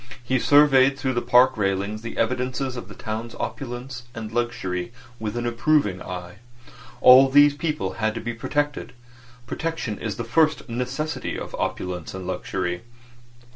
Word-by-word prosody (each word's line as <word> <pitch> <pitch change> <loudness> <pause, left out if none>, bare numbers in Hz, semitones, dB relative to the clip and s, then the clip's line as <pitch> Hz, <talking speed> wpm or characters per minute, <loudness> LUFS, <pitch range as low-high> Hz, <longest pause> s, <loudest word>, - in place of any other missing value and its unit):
He 130 +1 +1
surveyed 135 -1 +5
through 130 -2 -1
the 120 - 0
park 130 +1 +5
railings 100 +1 -1
the 115 - -7
evidences 130 +2 -1
of 125 - -7
the - - -11
town's 115 +1 -5
opulence 125 -2 -5
and 110 -1 -6
luxury 115 -5 -2 0.3
with 110 +1 -4
an 120 - -2
approving 120 -5 +1
eye. 90 +1 -7 0.6
All 130 +1 +9
these 145 +1 +6
people 150 - -2
had 110 0 +1
to - - -3
be 120 +1 -4
protected. 145 +1 -2 0.5
Protection 145 -6 -3
is 110 -4 -3
the 115 - -4
first 155 +6 +2
necessity 125 +6 -3
of - - -7
opulence 90 -1 -4
and 95 -1 -6
luxury. 90 -1 -3
120 Hz, 150 wpm, -24 LUFS, 105-135 Hz, 0.6 s, All